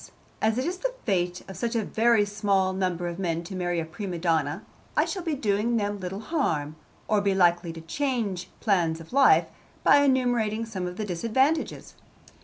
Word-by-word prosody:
'As 220 +1 +2
it 255 - 0
is 360 +2 -3
the - - -2
fate 180 -4 0
of 190 - -8
such 230 +6 -2
a 225 - +1
very 225 -1 +3
small 200 -2 +1
number 180 -2 -1
of 170 +1 -5
men 170 -3 -1
to 190 +3 -7
marry 175 -1 -1
a 165 - -2
prima 185 +1 -5
donna, 165 -1 0 0.3
I - - +4
shall 380 - -4
be 325 -3 -2
doing 225 -1 +1
little 205 -2 -3
harm, 160 - -1 0.3
or 210 -1 +2
be 200 -1 +1
likely 175 -2 +3
to 165 - -9
change 215 - -2
plans 170 -6 +1
of 165 +7 -12
life, 275 0 +6 0.4
by - - +7
enumerating 245 -5 +2
some 190 -5 -4
of 180 +1 -7
the 215 - -2
disadvantages.' 230 - 0
200 Hz, 185 wpm, -26 LUFS, 175-235 Hz, 0.4 s, by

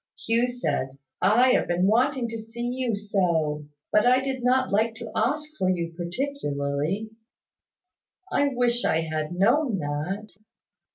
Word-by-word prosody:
Hugh 230 +2 +2
said, 145 - -2 0.2
"I 235 +7 +5
have - - +2
been 175 +1 +1
wanting 235 +3 +2
to 225 0 -5
see 225 +2 -6
you 250 -2 -1
so! 170 -8 0 0.2
But 210 +3 +4
I 255 +1 +5
did 265 -1 -3
not 255 +1 +2
like 220 +3 +1
to 225 -1 -8
ask 300 +7 0
for 185 - +2
you 170 -2 -1
particularly." 175 - -2 1.2
"I 285 - +3
wish 245 -2 +1
I 160 - +2
had 155 0 -3
known 235 +5 +3
that." 165 +8 -3
215 Hz, 145 wpm, -25 LUFS, 170-245 Hz, 1.2 s, I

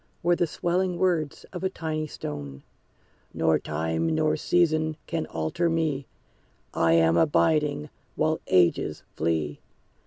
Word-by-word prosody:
Were 175 +1 +4
the 175 - +1
swelling 180 +2 -1
words 170 -6 0
of 180 - -6
a 190 - +1
tiny 155 -3 -3
stone, 70 - -7 0.7
"Nor 80 0 +2
time 80 +1 -2
nor 80 -1 +2
season 155 - +1
can 165 -2 -3
alter 80 - -1
me; 155 -5 -1 0.7
I 85 0 +3
am 80 0 +4
abiding, 150 - +2 0.2
while 155 +1 0
ages 90 -2 +2
flee. 80 -2 -1
150 Hz, 125 wpm, -26 LUFS, -, 0.7 s, Were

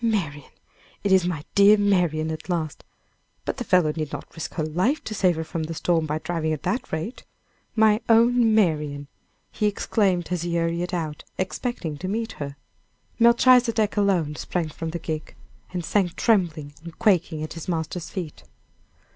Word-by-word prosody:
"Marian! 165 - -1 0.5
it 200 - +1
is 185 -2 +5
my 160 -5 -3
dear 200 +1 +7
Marian 175 -6 +1
at 160 +3 -7
last; 160 -3 -2 0.6
but - - -2
the 245 - -3
fellow 180 -8 +3
need 155 -3 -3
not - - -7
risk 160 - -6
her 155 - -1
life 185 - 0
to 215 - -5
save 185 -4 +2
her 160 - -3
from 165 +1 -4
the 160 +1 -4
storm 165 -1 +1
by 150 +1 -1
driving 160 -1 -2
at 150 - -5
that 250 - -2
rate. 160 +10 -4 0.5
My 220 0 +4
own 230 0 +5
Marian!" 150 -8 +1 0.4
he 210 - 0
exclaimed, 195 -4 0
as 180 -2 0
he 170 0 -2
hurried 170 +2 -1
out, 160 -4 -3
expecting 185 - -3
to 185 - -4
meet 225 +3 -2
her. 140 -1 -4 0.6
Melchizedek 235 -2 +5
alone 185 -8 +1
sprang 170 -3 -2
from 165 +2 -5
the 170 - -3
gig, 155 -2 -5 0.4
and 180 -2 -3
sank 185 -3 +1
trembling 170 -10 +1
and 170 -1 -10
quaking 175 -7 +2
at 155 - -5
his 165 - -8
master's 165 0 -3
feet. 175 -6 -6
175 Hz, 170 wpm, -24 LUFS, 155-205 Hz, 0.6 s, dear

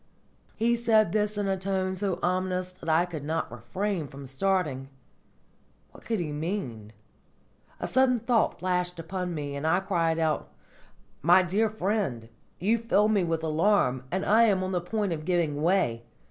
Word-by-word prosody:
He 235 +2 +2
said 220 -5 +3
this 210 +1 0
in 205 -1 -1
a 195 - +1
tone 190 0 -1
so 190 -1 -1
ominous 185 0 0
that 180 -3 -8
I 160 +2 +4
could 165 -5 -7
not 160 -4 -2
refrain 160 - -3
from 140 0 -10
starting. 135 -2 -1 1.0
What - - -16
could 225 -3 0
he 160 -4 -3
mean? 145 - -4 0.9
A - - -3
sudden 260 -2 +3
thought 235 0 +1
flashed 180 -1 -1
upon 180 +1 -4
me, 145 -2 -4
and 140 +3 -2
I 180 +3 +3
cried 170 -4 0
aloud: 160 -2 0 0.8
"My 175 +4 +6
dear 205 +5 +1
friend, 190 - -2 0.3
you 220 +6 +1
fill 215 -2 +2
me 205 -4 +2
with 165 -1 -1
alarm, 155 -5 +2
and 190 +2 -1
I 225 +3 +5
am 195 -4 +2
on 185 - -2
the 180 -2 0
point 205 +1 -1
of 155 -1 -5
giving 165 -4 0
way! 165 -10 +2
180 Hz, 170 wpm, -27 LUFS, 160-205 Hz, 1.0 s, My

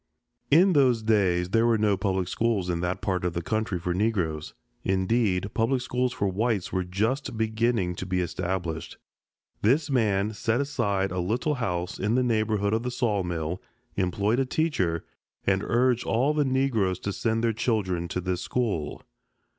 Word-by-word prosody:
In 180 +6 +6
those 125 -6 +3
days 95 -5 +2
there 115 +1 +3
were 115 -1 +3
no 105 -2 +2
public 95 -2 -1
schools 100 -3 0
in 85 - -1
that 90 +1 -2
part 95 -3 -1
of 90 -1 -1
the 85 - -2
country 110 0 -1
for 90 +1 -2
the 90 - -2
Negroes. 85 -9 -1 0.3
Indeed, 95 0 +1
public 120 +3 +1
schools 125 0 0
for 100 - -1
whites 100 0 -1
were 95 -1 +1
just 110 +8 -1
beginning 110 -4 +1
to 95 - -5
be 90 0 0
established. 90 -2 -3 0.6
This 140 +7 +2
man 105 -4 +1
set 110 +3 0
aside 105 -9 0
a 90 - -2
little 115 - 0
house 90 -9 -3
in 105 +4 +1
the 130 - +3
neighborhood 110 -3 +1
of 110 - +1
the 125 - -3
sawmill, 95 - -1 0.3
employed 100 +5 +1
a 135 - +2
teacher, 95 - 0 0.4
and 95 -1 +2
urged 125 0 +2
all 130 +6 +1
the 150 -1 +1
Negroes 130 -9 +1
to 100 - -3
send 115 +2 0
their 115 -1 +2
children 100 -7 -1
to 90 - -3
this 90 0 -2
school. 105 -12 -2
105 Hz, 170 wpm, -26 LUFS, 90-120 Hz, 0.6 s, In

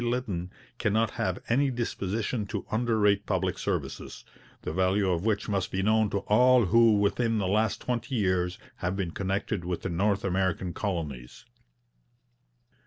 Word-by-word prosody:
Lytton 120 -8 -2 0.3
cannot 110 0 +1
have - - -2
any 135 +4 +2
disposition 110 -2 -2
to - - -4
underrate 110 -3 +2
public 95 -2 -1
services, - - -4 0.4
the - - -3
value 95 +2 +2
of 90 +2 -1
which 105 -1 0
must 100 -3 -1
be 95 0 -2
known 110 0 +3
to 100 - -1
all 125 +3 +4
who 115 +2 +5
within 115 +3 +1
the 100 -3 0
last 105 +1 +1
twenty 125 +1 -2
years 90 -4 0 0.2
have 90 +2 -2
been 95 -4 -2
connected 95 +1 -2
with 90 0 -4
the - - -2
North 100 +3 +1
American 95 -1 0
Colonies.' 80 - -4
100 Hz, 150 wpm, -28 LUFS, 95-110 Hz, 0.4 s, who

